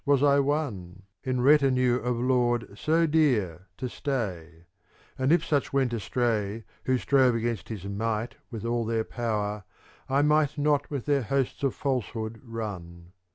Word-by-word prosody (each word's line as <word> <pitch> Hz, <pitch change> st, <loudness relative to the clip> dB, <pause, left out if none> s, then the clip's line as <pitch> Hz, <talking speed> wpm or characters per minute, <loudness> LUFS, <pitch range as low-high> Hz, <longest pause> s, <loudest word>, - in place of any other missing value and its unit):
184 140 Hz, 0 st, +3 dB
CANZONIERE 95 Hz, -, -9 dB, 0.2 s
In 130 Hz, -1 st, 0 dB
retinue 130 Hz, -3 st, +4 dB
of 125 Hz, -1 st, -2 dB
lord 120 Hz, -2 st, +1 dB
so 160 Hz, +8 st, +2 dB
dear 115 Hz, -, +1 dB
to 130 Hz, -, -3 dB
stay; 90 Hz, -, -4 dB, 0.5 s
And 130 Hz, +2 st, +1 dB
if 165 Hz, -1 st, +3 dB
such 145 Hz, -3 st, 0 dB
went 135 Hz, -3 st, +1 dB
astray 110 Hz, -1 st, -1 dB, 0.2 s
Who 130 Hz, 0 st, +2 dB
strove 130 Hz, -2 st, +3 dB
against 115 Hz, -1 st, -2 dB
his 105 Hz, -4 st, -6 dB
might 110 Hz, +3 st, -2 dB, 0.2 s
with 115 Hz, -2 st, -6 dB
all 120 Hz, 0 st, 0 dB
their 115 Hz, 0 st, 0 dB
power, 105 Hz, -4 st, -2 dB, 0.5 s
I 140 Hz, +2 st, +3 dB
might 150 Hz, -1 st, +2 dB
not 145 Hz, -1 st, +1 dB
with 140 Hz, -5 st, -4 dB
their 145 Hz, -2 st, +2 dB
hosts 135 Hz, +2 st, -1 dB
of 135 Hz, -3 st, 0 dB
falsehood 115 Hz, -4 st, -3 dB
run. 90 Hz, -7 st, -7 dB
120 Hz, 150 wpm, -27 LUFS, 110-140 Hz, 0.5 s, retinue